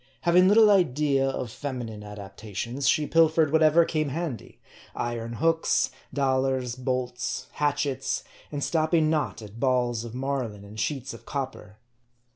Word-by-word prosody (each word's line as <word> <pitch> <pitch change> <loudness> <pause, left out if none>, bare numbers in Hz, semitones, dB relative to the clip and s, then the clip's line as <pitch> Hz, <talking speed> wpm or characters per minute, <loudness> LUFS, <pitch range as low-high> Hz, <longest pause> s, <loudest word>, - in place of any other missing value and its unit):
Having 180 +1 +5
little 210 +1 +7
idea 145 -7 +2
of 125 -3 -4
feminine 120 -6 -5
adaptations, 105 +5 -4
she 155 -2 +2
pilfered 160 -1 +3
whatever 160 +1 +5
came 155 -3 -1
handy: 150 - -5 0.4
iron 115 -1 -3
hooks, 165 +5 +1 0.2
dollars, 130 -3 0
bolts, 125 -1 -3
hatchets, 145 -3 -1 0.3
and 145 -1 -3
stopping 155 +2 +2
not 150 -7 -1
at 105 +2 -11
balls 125 -3 +1
of 120 0 -8
mar 135 -1 -1
line 105 -2 -11
and 105 +2 -10
sheets 135 +1 -2
of 115 - -13
copper. 130 -7 -5
135 Hz, 135 wpm, -26 LUFS, 120-155 Hz, 0.4 s, little